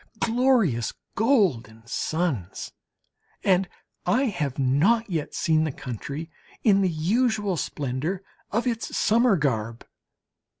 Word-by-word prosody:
Glorious 225 - +2 0.2
golden 165 - +1
suns! 130 - -2 0.7
And 185 -1 +3 0.3
I 255 +3 +2
have 170 - -2
not 150 - +3
yet 160 -4 -2
seen 155 -1 +2
the 155 - -1
country 140 +6 -6 0.3
in 200 -3 +5
the 190 - +2
usual 205 +4 +1
splendour 150 +6 -3 0.3
of 230 +4 0
its 230 -2 -2
summer 225 -1 +4
garb. 115 -5 -2
175 Hz, 110 wpm, -25 LUFS, 135-220 Hz, 0.7 s, in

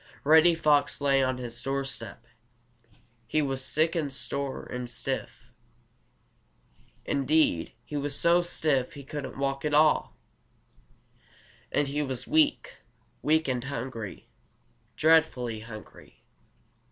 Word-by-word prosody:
Reddy 160 +3 +6
Fox 150 -3 +2
lay 140 -1 +3
on 130 -1 0
his 120 -1 -6
doorstep. 135 -4 -4 1.0
He 155 - +1
was 135 -1 -2
sick 160 +4 +1
and 150 -4 -1
sore 140 0 -4
and 125 -1 -6
stiff. 125 0 -5 1.5
Indeed, 140 - +1
he 150 - -5
was 145 0 -2
so 170 +1 +4
stiff 155 -6 0
he 140 -2 -9
couldn't 145 0 -6
walk 135 0 -2
at 150 -1 +1
all. 150 - +3 1.6
And 145 - +1
he 145 +2 -1
was 130 -3 -3
weak 305 -1 +1 0.4
weak 160 +1 +2
and 125 -1 -1
hungry, 120 -6 -6 0.7
dreadfully 150 -8 +3
hungry. 110 -1 -12
140 Hz, 115 wpm, -28 LUFS, 125-155 Hz, 1.6 s, Reddy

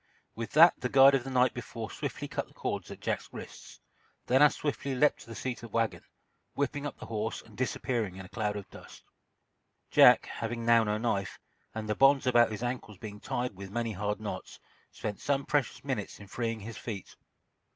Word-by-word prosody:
With 115 0 -6
that 165 +3 +8
the 125 - -2
guide 135 +1 +7
of 135 -3 +2
the 135 - -6
night 125 -1 +3
before 115 -2 -6
swiftly - - -4
cut - - -3
the - - -23
cords - - -3
at - - -9
Jack's - - -2
wrists, - - -10 0.5
then 130 +2 +3
as 150 -1 +6
swiftly 140 -2 -2
leaped 150 +4 +3
to - - -12
the 115 - -8
seat 125 +4 -4
of 115 - -9
the - - -10
wagon, 115 -1 0 0.5
whipping 145 +1 -1
up 145 - -8
the - - -9
horse 110 0 -3
and 110 - -17
disappearing 120 -5 -1
in 95 0 -8
a - - -13
cloud 105 -2 -2
of 100 -2 -6
dust. - - -13 0.9
Jack, - - +7
having 115 0 -4
now 115 -1 +6
no 105 -1 0
knife, 100 -4 -1 0.4
and 110 -1 -4
the 105 - +1
bonds 135 +4 +5
about 120 -2 +5
his 110 +2 -5
ankles 120 -4 -4
being 105 +1 -8
tied 120 -1 -3
with 95 0 -8
many 115 +2 -2
hard 105 +1 -2
knots, 105 -4 -6 0.3
spent 105 -1 -5
some 140 -1 0
precious 145 -4 0
minutes 130 -8 -3
in 100 - -10
freeing 115 +2 -3
his 110 +2 -8
feet. 105 -6 -7
115 Hz, 205 wpm, -30 LUFS, 105-130 Hz, 0.9 s, that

